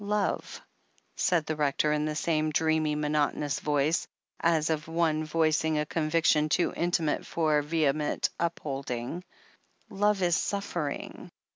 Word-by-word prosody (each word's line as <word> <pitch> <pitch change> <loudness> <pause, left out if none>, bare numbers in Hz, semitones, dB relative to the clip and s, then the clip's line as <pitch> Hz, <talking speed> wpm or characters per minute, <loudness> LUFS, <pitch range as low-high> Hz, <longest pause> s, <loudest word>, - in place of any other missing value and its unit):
"Love," 205 0 -1 0.6
said 170 -4 +1
the 155 - -2
Rector 150 0 +1
in 150 0 0
the 155 0 -2
same 155 -1 0
dreamy, 155 0 +1
monot 150 0 +1
onous 145 -3 -2
voice, 150 +2 +1 0.3
as 165 -1 +2
of 155 -1 -2
one 165 -1 +1
voicing 155 0 +1
a 150 - 0
conviction 155 -1 +2
too 175 - +1
intimate 170 -3 0
for 155 -3 +1
vehement 150 -1 0
upholding, 140 -2 -3 0.7
"Love 205 -1 +1
is 175 -2 +3
suffering. 175 -7 -3
155 Hz, 130 wpm, -28 LUFS, 150-165 Hz, 0.7 s, is